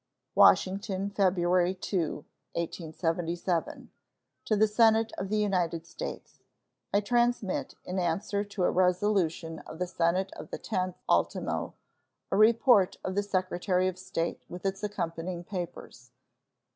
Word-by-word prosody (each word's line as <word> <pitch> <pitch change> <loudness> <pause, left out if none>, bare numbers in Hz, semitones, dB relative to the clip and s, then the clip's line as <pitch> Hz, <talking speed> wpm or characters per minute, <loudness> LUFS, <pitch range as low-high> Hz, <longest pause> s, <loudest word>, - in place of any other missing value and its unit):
WASHINGTON, 195 +1 +3
February 180 -2 +2
2, 170 -5 -2 0.3
1877. 170 +1 -2 0.5
To 215 - +2
the 215 +1 +4
Senate 225 +1 +4
of 190 - -3
the 215 - +1
United 180 -5 0
States: - - -7 0.5
I 205 - +3
transmit, 240 -2 0
in 185 +1 -3
answer 195 +4 0
to 200 -2 -4
a - - +3
resolution 180 -3 +1
of 160 - -10
the 180 - -1
Senate 180 +2 0
of - - -9
the - - -4
10th 185 -4 -2
ultimo, - - 0 0.6
a - - +2
report 220 -1 +5
of 185 - -2
the 200 - +1
Secretary 185 -1 0
of 185 -1 -3
State, 180 -2 -3
with 180 +2 -8
its 195 +1 -1
accompanying 175 -3 -3
papers. 175 -9 -7
185 Hz, 130 wpm, -29 LUFS, 175-205 Hz, 0.6 s, report